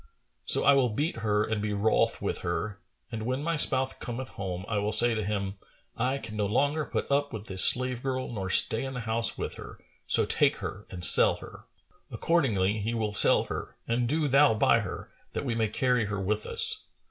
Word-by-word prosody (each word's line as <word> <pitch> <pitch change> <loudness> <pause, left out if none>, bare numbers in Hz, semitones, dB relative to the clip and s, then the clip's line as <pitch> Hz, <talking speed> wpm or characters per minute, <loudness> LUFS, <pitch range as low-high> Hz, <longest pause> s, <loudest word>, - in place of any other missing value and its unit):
So - - +5
I 140 - +5
will 135 -3 +2
beat 145 +8 -3
her 105 -2 0
and 110 -1 -3
be 105 0 -3
wroth 105 +2 0
with - - -3
her 100 +4 -4 0.3
and 110 -2 -5
when 130 +4 -3
my 165 +1 -1
spouse 130 -3 +2
cometh 125 +2 -7
home, 95 -1 -6
I 105 -2 -1
will 105 +1 -2
say 115 +2 +2
to 110 -1 -3
him, 100 -1 -4 0.4
'I 130 +3 -1
can 110 -5 -8
no 105 -1 -1
longer 145 +8 0
put - - -4
up 145 +1 0
with 110 -1 -7
this 95 -3 +3
slave 125 -1 +4
girl 130 -2 -4
nor 95 -4 -5
stay 110 +5 +3
in 135 0 -6
the 125 - -4
house 115 0 0
with - - -5
her; - - -11 0.3
so - - +2
take - - +1
her 100 +3 -8
and 90 -5 +4
sell - - +7
her.' - - -13 0.4
Accordingly 110 - 0
he 110 +3 -3
will 110 -2 -2
sell - - +5
her - - -7
and 120 +1 -1
do 155 +1 0
thou 140 -3 +4
buy - - +3
her, - - -7 0.2
that - - -4
we 120 - -2
may 115 -1 0
carry 125 +1 0
her 100 -1 -4
with 105 +2 -2
us." - - +1
115 Hz, 215 wpm, -27 LUFS, 105-130 Hz, 0.4 s, sell